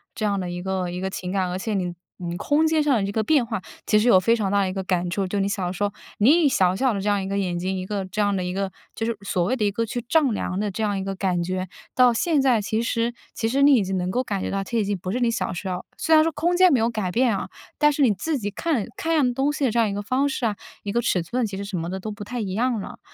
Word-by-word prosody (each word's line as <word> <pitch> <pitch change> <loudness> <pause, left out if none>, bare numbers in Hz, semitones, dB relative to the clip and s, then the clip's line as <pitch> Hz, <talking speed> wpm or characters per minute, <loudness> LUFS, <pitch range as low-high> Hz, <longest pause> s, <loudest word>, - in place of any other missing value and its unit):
这 215 - -4
样 200 -1 0
的 180 -1 -3
一 175 0 -5
个 185 -1 -2
一 180 - -5
个 190 - -1
情 185 -1 -5
感， 190 -2 0
而 180 - -2
且 215 +3 -3
你 180 -3 -1 0.3
你 175 -1 -4
空 300 - +2
间 315 -1 +2
上 295 -2 +3
的 200 - 0
这 200 - -2
个 220 +1 0
变 290 +1 +3
化， 220 -3 -2 0.3
其 210 - +4
实 215 +3 +2
有 190 -6 +7
非 230 +5 +3
常 200 -4 -1
大 200 - +3
的 190 - 0
一 - - -4
个 190 0 -3
感 180 -1 0
触。 195 +3 -1
就 200 +2 -2
你 195 - +1
的 - - -2
小 185 -3 -2
时 190 +2 -3
候， 205 - +1 0.3
你 300 +11 +5
以 - - +6
小 185 -8 +3
小 260 +3 +2
的 200 - -2
这 210 - 0
样 205 -1 +1
一 - - -4
个 195 - -2
眼 185 -3 -1
睛， 185 +2 -2
一 185 - -4
个 195 0 -3
这 185 +3 -2
样 205 -1 +2
的 185 - -1
一 180 0 -3
个 195 0 -2 0.2
就 225 - -3
是 230 - -2
所 185 -2 0
谓 205 +9 +1
的 220 -5 0
一 205 - +2
个 230 +3 -2
去 240 +2 -4
丈 300 -2 +3
量 195 -3 -2
的 210 0 0
这 220 +3 -3
样 205 -2 0
一 - - -3
个 195 0 -3
感 185 -2 0
觉， 185 +1 -2 0.3
到 250 -1 +6
现 310 +6 +1
在 250 -5 +3
其 220 +3 -1
实 230 0 0 0.2
其 225 - -1
实 275 +3 +2
你 285 0 +7
已 230 -7 +4
经 190 0 -2
能 180 0 -1
够 250 +6 0
感 205 -5 -2
觉 - - -3
到 195 0 -1
其 235 +4 -3
实 - - +3
已 - - -3
经 205 - 0
不 185 - -4
是 245 - -1
你 240 -1 +2
小 230 - -2
时 185 +2 -5
候， 180 -1 -3
虽 320 - +1
然 310 0 +7
说 330 - +1
空 345 +3 0
间 365 0 +6
没 265 - +4
有 230 +1 +1
改 210 -5 -2
变 240 +1 +2
啊， - - -4 0.3
但 295 0 +5
是 290 0 +1
你 245 - +5
自 295 - -2
己 205 -4 -3
看 255 -1 -1
看 330 -5 0
样 260 -5 +3
东 270 +3 +1
西 295 -1 -1
的 250 - +2
这 235 - +1
样 225 -2 +3
一 - - -3
个 205 - -3
方 265 +6 +1
式 265 -3 -2
啊， 210 - 0 0.3
一 200 - -3
个 235 - +1
尺 180 -6 +1
寸， 235 +7 -1
其 195 -2 -6
实 200 - -4
什 200 - -5
么 165 +1 -4
的 190 +1 -4
都 215 +3 -5
不 205 0 -7
太 245 +4 -5
一 200 -4 -3
样 235 +2 +1
了。 - - -8
205 Hz, 365 characters per minute, -24 LUFS, 190-245 Hz, 0.3 s, 有